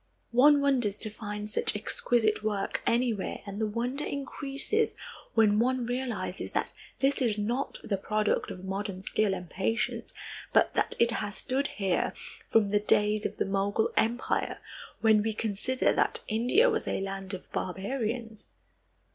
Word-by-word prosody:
One 285 +4 +6
wonders 245 -8 +2
to 215 - 0
find 210 -1 -5
such 210 - 0
exquisite 215 +1 +1
work 210 -2 -1
anywhere 235 -4 0
and 200 +1 -5
the 220 - +2
wonder 245 +7 -2
increases 280 +9 -1 0.4
when 215 -2 +5
one 250 +1 +1
realizes 240 -7 -3
that - - 0 0.3
this 275 +1 +2
is 225 -4 +2
not 235 +6 -1
the 200 - -1
product 215 +1 0
of 185 -1 -7
modern 195 -1 -4
skill 210 -1 +1
and 180 -1 -7
patience, 225 +7 -1 0.4
but - - +4
that - - 0
it 235 0 +4
has 205 -2 -3
stood 275 +1 -1
here, 195 -3 0 0.3
from 220 -3 +3
the 205 +1 +3
days 210 0 +2
of - - -12
the - - +1
Mogul 200 +2 +1
Empire, 235 +3 0 0.4
when 220 -2 +5
we 220 0 -1
consider 225 +5 0
that - - 0
India 245 - +3
was 445 -2 0
a - - 0
land 195 0 -4
of 185 - -12
barbarians. 220 +3 -3
215 Hz, 155 wpm, -29 LUFS, 205-250 Hz, 0.4 s, One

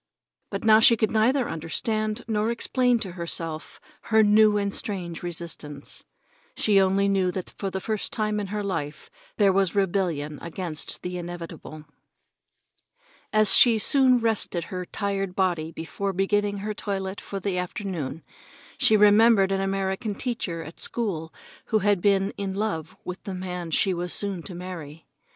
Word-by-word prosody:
But - - -4
now 220 -1 +7
she 230 +1 +6
could 220 - +1
neither 240 +4 +2
understand 215 +7 -2
nor 215 0 0
explain 245 +1 +1
to 190 - -4
herself 165 -2 -4 0.3
her 220 -1 +4
new 210 0 +5
and 200 -1 -1
strange 180 -5 -2
resistance. 165 -4 -4 0.5
She 200 -2 +4
only 195 +1 +2
knew 195 -2 +2
that 180 0 -5
for 195 - -4
the 190 - -3
first 215 +2 -2
time 215 -1 -1
in 205 - -3
her 210 +1 -3
life 155 -6 -4 0.3
there 200 -3 +4
was 195 -1 +1
rebellion 170 -7 0
against 170 -2 -4
the 180 0 -4
inevitable. 170 -3 -8 1.5
As 215 -1 +4
she 230 -3 +7 0.2
rested 230 -9 +3
her 180 -1 -6
tired 195 -2 -3
body 175 -4 0
before 195 +5 -4
beginning 205 +2 0
her 215 - -2
toilet 195 -1 -4
for 200 - -5
the 190 -1 -1
afternoon, 175 -5 -4 0.6
she 215 - +5
remembered 210 -1 +5
an 195 0 0
American 195 +2 -2
teacher 200 -10 -3
at 160 - -11
school 175 -9 -2 0.3
who 220 - +1
had 205 -2 +2
been 195 0 +2
in 195 -1 -3
love 195 -7 -3
with 180 +1 -6
the 195 -3 -4
man 180 -2 -5
she 185 +4 +2
was 175 0 -3
soon 200 -4 0
to 180 - -9
marry. 165 -4 -8
195 Hz, 155 wpm, -25 LUFS, 175-210 Hz, 1.5 s, now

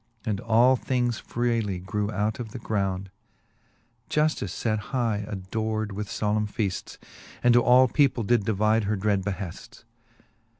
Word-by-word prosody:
And 105 -3 -1
all 120 +3 +4
things 125 -2 -1
freely 115 -5 -1
grew 100 +3 -3
out 105 +2 -1
of 110 -3 -6
the - - -5
ground: 95 -4 -2 1.0
Juftice 150 -12 0
late 110 -2 +1
high 110 -1 -1
ador'd 110 +2 -3
with 105 +1 -4
folemne 105 +1 -1
feafts, 100 -3 -3 0.5
And 120 0 +6
to 120 - +6
all 125 +2 +6
people 130 -3 +2
did 120 0 +2
divide 110 +1 +2
her 105 +2 0
dred 100 -1 0
beheafts. 100 +3 -6
110 Hz, 140 wpm, -26 LUFS, 100-120 Hz, 1.0 s, And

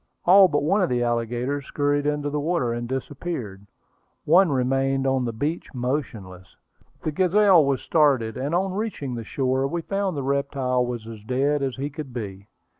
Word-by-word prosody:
All 190 +2 +8
but 145 -4 0
one 195 +7 +2
of 180 - +1
the 120 -1 0
alligators 120 +4 -2
scurried 145 0 0
into 145 -1 -1
the 150 - -1
water, 145 -6 0
and 120 0 -4
disappeared. 130 - -5 0.6
One 180 +4 +5
remained 135 +1 +1
on 130 -1 +1
the 120 - -2
beach 145 +9 -3
motionless. 115 -8 -4 0.5
The 155 - -1
Gazelle 185 +1 +4
was 140 -2 0
started, 135 -9 +2
and 140 +6 -2
on 190 +1 0
reaching 195 - -3
the 115 -1 -5
shore 130 +3 0
we 170 +3 -3
found 195 -3 -2
the 140 - -2
reptile 135 -2 0
was 120 -2 -4
as 110 -2 -9
dead 140 +5 0
as 135 -2 -2
he 140 +2 -4
could 145 -3 -8
be. 100 -4 -6
135 Hz, 180 wpm, -24 LUFS, 125-155 Hz, 0.6 s, All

